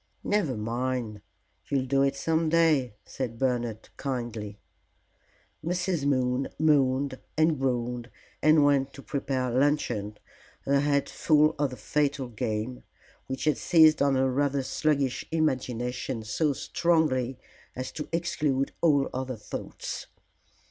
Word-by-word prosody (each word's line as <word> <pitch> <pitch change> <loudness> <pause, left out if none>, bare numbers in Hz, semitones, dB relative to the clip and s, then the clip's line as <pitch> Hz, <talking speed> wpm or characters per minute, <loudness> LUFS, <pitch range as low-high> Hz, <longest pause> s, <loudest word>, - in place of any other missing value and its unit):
"Never 180 - 0
mind, 115 -1 -2 0.5
you'll 135 -2 +1
do 135 +1 +2
it 140 0 +2
some 160 +3 0
day," 155 -8 +3
said 120 -4 -5
Bernard, 120 -4 -1
kindly. 120 -6 -4 1.1
Mrs. 175 -2 -1
Moon 130 -1 +1
moaned 140 -3 +2 0.2
and 155 -2 +3
groaned 125 -2 -1 0.3
and 155 0 +5
went 140 -1 +2
to 140 - -11
prepare 130 -3 -2
luncheon, 125 -6 0 0.5
her 140 0 +2
head 140 0 +1
full 155 0 +3
of 145 -2 +2
the 125 - -8
fatal 140 +3 -1
game, 110 +2 -3 0.5
which 130 0 -4
had 155 -1 +2
seized 160 -3 +5
on 140 -1 +3
her 130 0 +2
rather 140 0 +1
sluggish 140 -2 0
imagination 125 -5 -1
so 150 +7 0
strongly 140 -5 +1 0.4
as 130 +1 -4
to 150 - -6
exclude 150 -5 0
all 145 -5 +4
other 130 -1 -3
thoughts. 105 - -6
135 Hz, 125 wpm, -27 LUFS, 125-150 Hz, 1.1 s, and